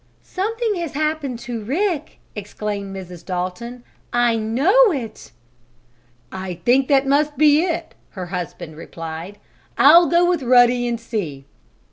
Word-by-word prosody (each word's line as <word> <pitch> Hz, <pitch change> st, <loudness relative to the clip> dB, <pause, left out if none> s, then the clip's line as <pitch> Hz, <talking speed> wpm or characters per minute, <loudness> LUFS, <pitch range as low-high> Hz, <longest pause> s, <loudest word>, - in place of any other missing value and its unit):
"Something 440 Hz, +2 st, -2 dB
has 340 Hz, -3 st, -4 dB
happened 305 Hz, -3 st, -2 dB
to 235 Hz, -2 st, -5 dB
Rick!" 315 Hz, -, -2 dB, 0.2 s
exclaimed 205 Hz, -1 st, -5 dB
Mrs. 180 Hz, -3 st, -9 dB
Dalton. 190 Hz, +7 st, -5 dB, 0.3 s
"I 240 Hz, -1 st, +2 dB
know 290 Hz, -, +3 dB
it!" 250 Hz, -8 st, -6 dB, 1.0 s
"I 185 Hz, -1 st, -5 dB
think 260 Hz, +2 st, +3 dB
that 275 Hz, -1 st, +3 dB
must 290 Hz, +2 st, +1 dB
be 305 Hz, +1 st, +5 dB
it," 340 Hz, -2 st, -3 dB, 0.2 s
her 185 Hz, -, -4 dB
husband 170 Hz, -3 st, -6 dB
replied. 165 Hz, +4 st, -8 dB, 0.4 s
"I'll 335 Hz, +5 st, +7 dB
go 345 Hz, +1 st, +3 dB
with 350 Hz, -4 st, +1 dB
Ruddy 245 Hz, -1 st, +4 dB
and 235 Hz, -1 st, -2 dB
see." 175 Hz, -, -5 dB
245 Hz, 130 wpm, -20 LUFS, 200-310 Hz, 1.0 s, I'll